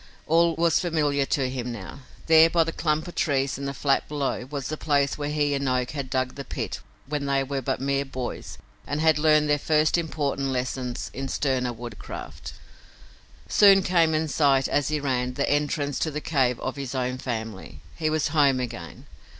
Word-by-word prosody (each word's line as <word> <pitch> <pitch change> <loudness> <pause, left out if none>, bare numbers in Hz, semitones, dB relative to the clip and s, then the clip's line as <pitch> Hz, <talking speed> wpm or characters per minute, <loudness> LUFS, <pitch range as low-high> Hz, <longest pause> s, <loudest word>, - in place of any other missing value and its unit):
All 165 +1 +3
was 170 0 +3
familiar 150 -5 0
to 135 -3 0
him 125 -1 -4
now. 115 +4 -8 0.3
There, 160 0 +7
by 165 0 +3
the 165 - -3
clump 155 0 -1
of 175 - -8
trees 135 -3 0
in 140 - -4
the 140 - -2
flat 135 +1 +1
below, 140 -3 -2
was 140 -2 -4
the 155 - -3
place 140 -3 +1
where 145 -1 -3
he 145 -1 +1
and 140 -1 0
Oak 125 -1 0
had 140 -3 -5
dug 130 -1 -1
the 140 - -7
pit - - -4 0.3
when 145 0 -3
they 135 0 +2
were 135 0 -3
but - - -2
mere 140 +1 0
boys 130 -2 -6 0.3
and 145 +2 -2
had 160 -1 +3
learned 150 -1 +4
their 150 0 +2
first 155 +3 +2
important 145 -4 -2
lessons 125 -1 -3
in 135 +1 -4
sterner 130 -2 0
woodcraft. 120 -2 -8 0.9
Soon 195 -2 +6
came 165 -3 +3
in 160 +1 0
sight, 140 -3 +3
as 145 - +1
he 155 -1 0
ran, 125 -3 -1
the 140 - 0
entrance 145 -1 0
to 160 - 0
the 150 0 -4
cave 130 -6 +1
of 130 - -4
his 135 -1 -5
own 125 0 -2
family. 110 - -6
He 155 -2 -1
was 155 0 0
home 145 -4 +3
again. 115 -9 -6
140 Hz, 195 wpm, -25 LUFS, 130-155 Hz, 0.9 s, There